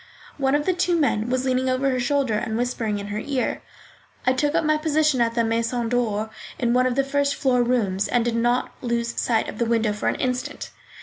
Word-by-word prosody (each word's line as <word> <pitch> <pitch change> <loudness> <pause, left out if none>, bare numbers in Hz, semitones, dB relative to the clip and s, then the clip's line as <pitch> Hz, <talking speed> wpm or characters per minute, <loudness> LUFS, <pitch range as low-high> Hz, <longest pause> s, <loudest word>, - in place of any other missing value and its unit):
One 270 0 +2
of 295 0 0
the 370 - +2
two 355 0 +1
men 230 -6 +1
was 255 0 0
leaning 260 0 +1
over 260 +1 +1
her 255 - 0
shoulder 265 -1 +1
and 220 +1 -1
whispering 235 -3 -1
in 200 0 -6
her 205 +1 -3
ear. 265 +2 -2 0.6
I 255 - +4
took 290 +4 0
up 335 -1 +2
my 310 0 +3
position 305 -3 +2
at 230 0 +1
the 235 - +2
Maison 230 +1 -1
d'or, 220 -3 -1 0.3
in 240 -1 +1
one 255 +1 +3
of 250 - -1
the 275 - +2
first 280 +1 0
floor 255 -3 +2
rooms, 220 -6 +1
and 240 -1 +1
did 235 -1 0
not 240 +2 +1
lose 235 -1 -1
sight 225 -2 +1
of - - -7
the 235 - +2
window 225 -2 +1
for 210 - -1
an - - -1
instant. 255 +3 -3
245 Hz, 230 wpm, -23 LUFS, 230-275 Hz, 0.6 s, I